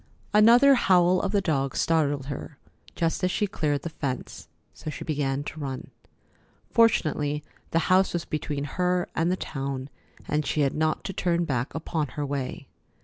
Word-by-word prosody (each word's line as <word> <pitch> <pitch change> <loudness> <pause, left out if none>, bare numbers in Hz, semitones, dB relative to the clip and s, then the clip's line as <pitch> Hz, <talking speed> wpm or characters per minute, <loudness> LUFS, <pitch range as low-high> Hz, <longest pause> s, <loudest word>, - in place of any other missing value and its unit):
Another 235 +6 +7
howl 185 -6 +4
of 195 - -1
the 205 -1 +2
dog 140 -7 0
startled 145 -4 +1
her 140 +1 -7 0.4
just 165 +1 -1
as 185 - +3
she 210 - 0
cleared 150 -7 -1
the 170 - -3
fence, 130 -5 -5 0.3
so 155 - -7
she 150 - -6
began 145 -2 -1
to 155 - -7
run. 135 -3 -5 0.8
Fortunately, 150 -10 +2 0.3
the - - 0
house 190 +1 +4
was 175 -2 -2
between 150 -2 -3
her 180 +4 0
and 165 +2 +1
the - - +2
town, 135 -3 -4 0.4
and 150 0 0
she 150 - 0
had 140 -2 +2
not 155 0 0
to 195 - -4
turn 175 -1 0
back 125 -4 -2
upon 160 -1 -2
her 145 - -1
way. 140 -2 -4
155 Hz, 170 wpm, -26 LUFS, 140-180 Hz, 0.8 s, Another